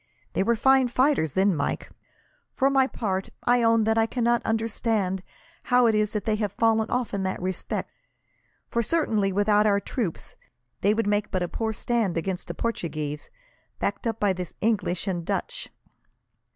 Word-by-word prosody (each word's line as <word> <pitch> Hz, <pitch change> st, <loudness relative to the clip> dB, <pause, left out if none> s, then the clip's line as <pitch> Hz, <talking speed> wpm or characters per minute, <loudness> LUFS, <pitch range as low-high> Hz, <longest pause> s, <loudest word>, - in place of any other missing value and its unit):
They -, -, +1 dB
were 235 Hz, +4 st, +2 dB
fine 265 Hz, +2 st, +4 dB
fighters 250 Hz, -, +1 dB
then, 190 Hz, -1 st, +3 dB
Mike. 140 Hz, -, -2 dB, 0.6 s
For 270 Hz, 0 st, +3 dB
my 265 Hz, -1 st, +4 dB
part, 195 Hz, -7 st, -3 dB
I 245 Hz, 0 st, +3 dB
own 230 Hz, -1 st, +4 dB
that 220 Hz, +1 st, +2 dB
I 225 Hz, -, +3 dB
cannot 240 Hz, 0 st, +1 dB
understand 220 Hz, -4 st, 0 dB, 0.4 s
how 245 Hz, 0 st, +4 dB
it 225 Hz, -, +4 dB
is 215 Hz, 0 st, +1 dB
they 215 Hz, 0 st, 0 dB
have 210 Hz, -2 st, -2 dB
fallen 225 Hz, 0 st, +2 dB
off 245 Hz, -4 st, -1 dB
in 200 Hz, -, -1 dB
that 190 Hz, 0 st, -2 dB
respect; 185 Hz, 0 st, -3 dB, 0.8 s
for 235 Hz, -, 0 dB
certainly, 220 Hz, -8 st, +1 dB
without 205 Hz, +2 st, +3 dB
our 200 Hz, -1 st, +3 dB
troops, 200 Hz, -, -4 dB, 0.5 s
they 205 Hz, +2 st, +3 dB
would 230 Hz, -, 0 dB
make 205 Hz, 0 st, 0 dB
but 185 Hz, -2 st, -1 dB
a -, -, -1 dB
poor 220 Hz, +5 st, -2 dB
stand 220 Hz, -4 st, -1 dB
against 180 Hz, +2 st, -3 dB
the -, -, -5 dB
Portuguese, 155 Hz, -9 st, -3 dB, 0.5 s
backed -, -, -2 dB
up 225 Hz, -1 st, -2 dB
by 205 Hz, -2 st, +2 dB
the 180 Hz, -2 st, -5 dB
English 205 Hz, -5 st, 0 dB
and 180 Hz, -4 st, -2 dB
Dutch." -, -, -3 dB
215 Hz, 170 wpm, -26 LUFS, 190-235 Hz, 0.8 s, fine